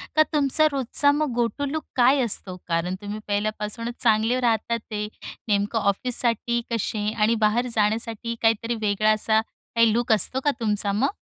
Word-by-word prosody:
का 310 - +6
तुमचा 300 +1 +3
रोजचा 280 +1 +2
मग 295 -2 -1
गोटू 240 +4 -1
लूक 315 +1 -3
काय 260 +2 +4
असतो? 195 -4 -3
कारण 170 +2 -1
तुम्ही 205 +1 -5
पहिल्यापासूनच 210 +3 -3
चांगले 225 +2 +2
राहत 230 -2 0
आहेत. 215 -2 -3 0.4
नेमकं 205 +2 +1
ऑफिससाठी 235 +3 0
कसे 215 -2 -1
आणि 225 +1 +2
बाहेर 225 +4 +2
जाण्यासाठी 225 +2 -1
काहीतरी 225 +1 +1
वेगळा 215 +1 +2
असा 220 0 +2 0.3
काही 230 -1 +4
लूक 240 +1 0
असतो 220 +5 +2
का 290 - +4
तुमचा 210 -2 0
मग? 250 - 0
225 Hz, 155 wpm, -24 LUFS, 210-245 Hz, 0.4 s, का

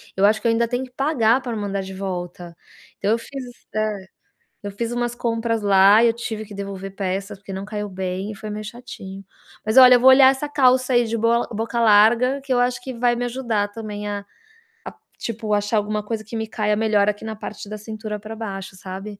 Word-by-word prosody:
eu 195 - +3
acho 215 +1 +3
que 235 - 0
eu - - +4
ainda 230 +1 +1
tenho 250 +2 -2
que 255 - -18
pagar 265 -4 +2
pra 240 -2 -4
mandar 200 -1 -2
de 190 0 -8
volta, 180 -2 -6 0.4
então 205 - 0
eu 230 - +3
fiz 270 +3 -7 0.3
hã, 215 0 +1 0.7
eu 205 - -5
fiz 230 +4 -4
umas 240 0 -1
compras 230 -1 -1
lá, 200 +2 +6
eu 235 - +5
tive 225 -2 -5
que 205 -1 -11
devolver 195 -1 -6
peças, 195 +1 -3
porque 195 0 -9
não 190 +1 -5
caiu 210 0 -4
bem 190 +2 -4
e 210 - -8
foi 215 +2 -8
meio 210 +1 -5
chatinho. 195 -4 -9 0.4
Mas, 220 +3 0
olha, 250 -1 +10
eu 245 - +4
vou 260 +2 +7
olhar 260 0 +8
essa 280 +2 -4
calça 255 -2 +3
aí 240 -1 +4
de 230 +1 -2
boa 230 +1 +2
boca 225 +2 -2
larga 230 +5 +4
que 270 0 -8
eu 245 - +2
acho 245 0 0
que 260 +1 -6
vai 240 0 +1
me 245 +1 -2
ajudar 235 -4 -1
também 210 -1 -6
a 205 -1 -4 0.6
a, - - -7 0.2
tipo, 220 -2 -3
achar 205 +2 +1
alguma 210 0 -1
coisa 215 0 -4
que 220 +2 -9
me 220 - -2
caia 210 -1 0
melhor 210 -1 +2
aqui 210 +1 -4
na 220 0 -4
parte 210 -1 -8
da 215 - -5
cintura 215 0 -6
para 215 +2 -8
baixo, 195 -4 -6
sabe. 195 +2 -8
215 Hz, 225 wpm, -22 LUFS, 205-235 Hz, 0.7 s, olha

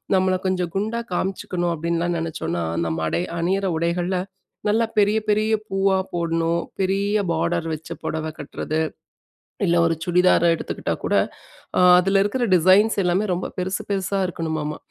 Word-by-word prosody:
நம்மளை 185 0 +2
கொஞ்சம் 180 -2 -1
குண்டா 220 +3 -1
காமிச்சுக்கணும் 180 -2 -1
அப்படின்லாம் 170 +2 -1
நினச்சோம்னா, 160 - -3 0.2
நம்ம 80 0 -2
அடை 175 - 0 0.2
அணியிற 190 +3 0
உடைகள்ல 175 +2 0 0.5
நல்லா 225 +2 +3
பெரிய 210 +1 +4
பெரிய 215 +1 +2 0.2
பூவா 195 0 +2 0.2
போடணும், 170 0 0 0.2
பெரிய 200 +2 +1
பார்டர் 165 0 0
வச்ச 155 +1 -7
புடவை 160 0 -2
கட்டுறது. 150 +2 -3 0.9
இல்ல, 170 -2 +2
ஒரு 165 - +2
சுடிதாரை 180 -1 +4
எடுத்துக்கிட்டா - - -3
கூட, - - 0 0.6
அ - - +4 0.2
அதில 195 +2 +2
இருக்கிற 240 +4 0
டிசைன்ஸ் 190 +6 +5
எல்லாமே 180 +4 +1
ரொம்ப 180 - -2
பெருசு 185 +2 -2
பெருசா 195 0 -1
இருக்கணுமாம. 160 -3 -3
180 Hz, 135 wpm, -22 LUFS, 165-195 Hz, 0.9 s, டிசைன்ஸ்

